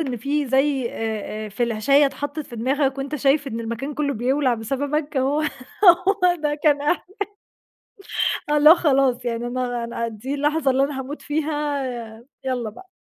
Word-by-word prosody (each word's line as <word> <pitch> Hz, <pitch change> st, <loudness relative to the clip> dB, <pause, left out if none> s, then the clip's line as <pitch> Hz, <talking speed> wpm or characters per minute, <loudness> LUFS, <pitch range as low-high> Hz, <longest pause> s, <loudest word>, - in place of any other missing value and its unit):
إن 265 Hz, -6 st, -2 dB
في 280 Hz, +5 st, -1 dB
زي 265 Hz, -1 st, +2 dB
آآ، 215 Hz, -1 st, -4 dB
آآ، -, -, -7 dB
فلاشاية 240 Hz, +6 st, +2 dB
اتحطت 290 Hz, +2 st, -5 dB
في 240 Hz, -5 st, -10 dB
دماغك 270 Hz, +3 st, 0 dB
وأنت 275 Hz, +2 st, -4 dB
شايف 280 Hz, 0 st, +2 dB
إن 230 Hz, -3 st, -4 dB
المكان 235 Hz, +6 st, -4 dB
كله 285 Hz, -1 st, 0 dB
بيولع 255 Hz, +3 st, +1 dB
بسببك، 285 Hz, +6 st, -2 dB
هو 270 Hz, +3 st, +1 dB, 0.4 s
هو 365 Hz, 0 st, +5 dB
ده 295 Hz, -1 st, 0 dB
كان 290 Hz, -2 st, +4 dB
إح 300 Hz, +4 st, 0 dB, 1.4 s
آه 295 Hz, -, +3 dB
اللي 300 Hz, +1 st, +7 dB
هو 330 Hz, -, +10 dB
خلاص 270 Hz, -6 st, +2 dB
يعني 235 Hz, 0 st, -2 dB
أنا 245 Hz, -1 st, -2 dB
أنا 235 Hz, 0 st, -3 dB
دي 230 Hz, +5 st, -5 dB
اللحظة 290 Hz, 0 st, +1 dB
اللي 265 Hz, +1 st, +2 dB
أنا 275 Hz, -1 st, -2 dB
هاموت 275 Hz, +3 st, -6 dB
فيها، 295 Hz, -2 st, -1 dB, 0.6 s
يالّا 245 Hz, -4 st, -1 dB
بقى. 370 Hz, -, -14 dB
275 Hz, 165 wpm, -22 LUFS, 245-295 Hz, 1.4 s, هو